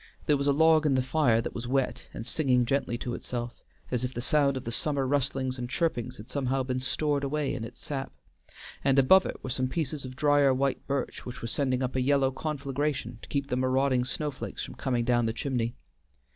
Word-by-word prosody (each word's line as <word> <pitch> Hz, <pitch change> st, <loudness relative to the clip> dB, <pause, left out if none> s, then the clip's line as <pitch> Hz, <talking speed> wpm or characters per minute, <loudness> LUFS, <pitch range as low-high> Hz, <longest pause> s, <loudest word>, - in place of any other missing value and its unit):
There 150 Hz, -, +4 dB
was 140 Hz, 0 st, -1 dB
a -, -, +5 dB
log 160 Hz, +1 st, +5 dB
in 135 Hz, -, +3 dB
the 130 Hz, -, +2 dB
fire 130 Hz, -4 st, +3 dB
that -, -, -5 dB
was 120 Hz, 0 st, -5 dB
wet, 135 Hz, +1 st, -1 dB
and 110 Hz, -, -7 dB
singing 125 Hz, -5 st, +2 dB
gently 130 Hz, -2 st, 0 dB
to 120 Hz, 0 st, -4 dB
itself, 120 Hz, 0 st, -5 dB, 0.3 s
as 125 Hz, -1 st, 0 dB
if 125 Hz, 0 st, -3 dB
the -, -, -3 dB
sound 140 Hz, +1 st, +2 dB
of 130 Hz, -, -5 dB
the 115 Hz, -, -4 dB
summer 140 Hz, +2 st, 0 dB
rustlings 130 Hz, -1 st, 0 dB
and 120 Hz, 0 st, -4 dB
chirpings 140 Hz, -5 st, -1 dB
had 105 Hz, -, -10 dB
somehow 135 Hz, -1 st, -1 dB
been 130 Hz, 0 st, -2 dB
stored 145 Hz, +2 st, 0 dB
away 145 Hz, 0 st, -1 dB
in 120 Hz, -, -4 dB
its 115 Hz, -, -9 dB
sap, 135 Hz, -2 st, -4 dB, 0.7 s
and 135 Hz, -1 st, +3 dB
above 185 Hz, +8 st, +6 dB
it -, -, -7 dB
were 130 Hz, -, -4 dB
some 130 Hz, +1 st, 0 dB
pieces 150 Hz, 0 st, -2 dB
of 130 Hz, 0 st, -7 dB
drier 145 Hz, -1 st, +4 dB
white 135 Hz, +1 st, -1 dB
birch, 140 Hz, -2 st, -2 dB
which 125 Hz, -1 st, -8 dB
were -, -, -2 dB
sending 130 Hz, +1 st, 0 dB
up 130 Hz, 0 st, -2 dB
a 130 Hz, -, +2 dB
yellow 135 Hz, 0 st, +3 dB
conflagration 140 Hz, -3 st, -3 dB
to -, -, -12 dB
keep 140 Hz, -1 st, 0 dB
the 125 Hz, -, 0 dB
marauding 130 Hz, 0 st, +2 dB
snow 150 Hz, +4 st, -1 dB
flakes 135 Hz, -, -6 dB
from -, -, -9 dB
coming 120 Hz, -3 st, -1 dB
down 120 Hz, -2 st, +2 dB
the 115 Hz, -, -1 dB
chimney. 120 Hz, -3 st, -2 dB
130 Hz, 225 wpm, -28 LUFS, 125-140 Hz, 0.7 s, above